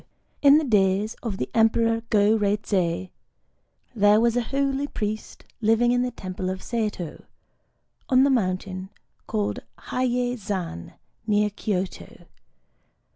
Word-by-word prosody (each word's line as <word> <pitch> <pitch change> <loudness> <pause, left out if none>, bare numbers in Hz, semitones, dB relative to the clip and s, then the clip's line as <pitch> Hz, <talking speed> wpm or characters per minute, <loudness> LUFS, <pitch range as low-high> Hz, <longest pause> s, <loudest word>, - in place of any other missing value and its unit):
In 285 0 +7
the 315 - +2
days 205 -3 +2
of 215 -5 -4
the 125 - -2
Emperor 225 0 +3
Go 210 +1 +4
Reizei, 200 -4 0 0.8
there 205 -1 +5
was 235 0 +2
a 245 - +2
holy 275 +3 -1
priest 215 -4 -5 0.2
living 225 +2 +3
in 245 0 +2
the 250 - 0
temple 185 -4 -5
of 185 0 -5
Saito, 210 -8 -3 0.9
on 260 -1 +5
the 280 - +4
mountain 185 -4 -1 0.4
called 210 -2 -1 0.2
Hiyei 250 -1 -1
Zan, 185 - -5 0.3
near 210 0 +2
Kyōto. 195 -2 -4
215 Hz, 125 wpm, -24 LUFS, 190-240 Hz, 0.9 s, In